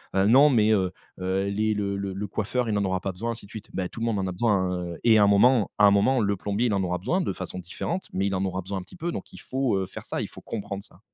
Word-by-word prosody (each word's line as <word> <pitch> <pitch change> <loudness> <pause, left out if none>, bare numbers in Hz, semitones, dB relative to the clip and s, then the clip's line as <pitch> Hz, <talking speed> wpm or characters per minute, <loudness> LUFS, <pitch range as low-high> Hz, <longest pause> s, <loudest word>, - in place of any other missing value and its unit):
«Heu, 95 0 +4
non 140 +6 +7
mais 110 -4 +4
heu, 95 -3 +1 0.3
heu, 95 +1 0
les 110 +2 +1
le 100 -1 -1
le 100 -1 -3
le 100 +2 -4
coiffeur 115 +4 -1
il 105 - +1
en 100 - +1
aura 95 0 0
pas 95 - -3
besoin, 115 +6 -3
ainsi 115 -3 -7
de 100 - -17
suite». 110 -2 -9
Ben, 95 -1 -2
tout 115 - -9
le - - 0
monde 110 -3 0
en 95 - -1
a 95 - -2
besoin, 105 +4 +1
hein, 90 -2 -1
heu - - -9
et 115 -2 +6
un 105 - +6
moment 105 +3 +4
un 105 -1 +8
moment 115 +6 +3
le 100 -2 +1
plombier 105 +5 -1
il 105 - 0
en 100 - +1
aura 90 -1 -1
besoin, 150 - 0
de - - -1
façon 90 0 -6
différente 165 - -4
mais 95 +1 0
il 100 - -1
en 95 - 0
aura 95 0 -2
besoin 95 +2 -5
un - - -6
petit 95 - -15
peu 170 0 -2
donc - - -7
il - - -10
faut, 130 -5 0
heu, 95 - -1
faire - - -9
ça, - - -3
il - - -3
faut - - -12
comprendre 100 -2 -5
ça. 90 - -12
100 Hz, 320 wpm, -26 LUFS, 95-115 Hz, 0.3 s, un